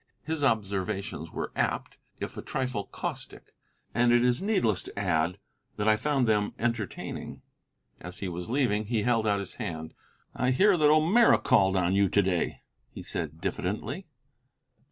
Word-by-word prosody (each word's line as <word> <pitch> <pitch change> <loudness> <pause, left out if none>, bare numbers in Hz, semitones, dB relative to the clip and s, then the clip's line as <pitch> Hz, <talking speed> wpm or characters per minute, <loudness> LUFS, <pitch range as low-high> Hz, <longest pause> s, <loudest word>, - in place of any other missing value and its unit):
His 160 +1 -2
observations 100 - -1
were - - -4
apt, - - -2 0.2
if - - -5
a - - -5
trifle 125 -6 -3
caustic, - - -6 0.4
and 120 +2 +3
it 120 0 +5
is 125 0 +2
needless 155 - +1
to - - -12
add 90 -2 +1 0.4
that 105 - -1
I 110 - +6
found 135 +2 +1
them 105 -2 +1
entertaining. 115 -3 -4 0.6
As 90 +1 -9
he 100 - -4
was 90 +2 -5
leaving 115 -5 +1
he 110 -2 0
held 115 -3 +2
out 100 -1 +3
his 100 -2 -6
hand. 80 -1 -5 0.4
"I 125 - 0
hear 190 +10 +5
that 150 -3 +4
O'Meara 165 +10 +5
called 95 -8 +3
on 90 -1 +2
you 100 -1 +3
to 100 - +4
day," 90 -2 -1 0.3
he - - -9
said 80 -2 -4
diffidently. 125 - -3
110 Hz, 160 wpm, -28 LUFS, 95-130 Hz, 0.6 s, I